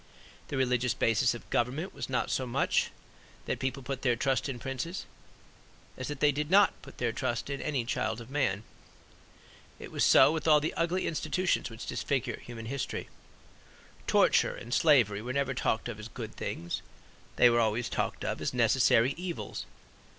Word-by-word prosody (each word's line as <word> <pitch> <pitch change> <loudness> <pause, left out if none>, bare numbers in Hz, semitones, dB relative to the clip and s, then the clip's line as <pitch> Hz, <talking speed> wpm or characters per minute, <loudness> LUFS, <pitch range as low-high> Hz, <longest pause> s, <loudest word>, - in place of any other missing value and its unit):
The 140 - -3
religious 125 -2 +1
basis 115 +2 +2
of 120 - -11
government 135 +10 0
was - - -6
not 130 - 0
so 130 - -1
much 120 - +1 0.6
that - - -2
people 135 0 -3
put 135 +1 -4
their 125 -3 +2
trust 135 +3 0
in 130 - -4
princes, 135 - -4 0.9
as 130 - -5
that 145 -2 -6
they 150 - +5
did 150 +2 -3
not 200 +2 +6
put - - -13
their 120 -2 0
trust 120 +4 -2
in 140 - -3
any 140 -6 -1
child 115 -1 -1
of 120 +2 -11
man. 130 -8 0 1.1
It - - -9
was - - 0
so - - +7
with 160 0 -2
all 150 -1 +7
the 155 +2 -2
ugly 175 +3 0
institutions 180 -2 0
which 115 0 -8
disfigure 135 -3 -2
human 115 -2 -8
history. 135 +3 -4 1.0
Torture - - +4
and 120 - -7
slavery 120 -12 +4
were 125 +3 -4
never 140 -1 0
talked 115 -3 0
of 115 -2 -6
as 105 - -7
good - - -7
things; 85 0 -4 0.5
they 120 - +6
were 120 - +3
always 110 +1 +1
talked - - -2
of - - -2
as - - -2
necessary 115 +4 +4
evils. 175 -1 -5
130 Hz, 175 wpm, -30 LUFS, 120-145 Hz, 1.1 s, so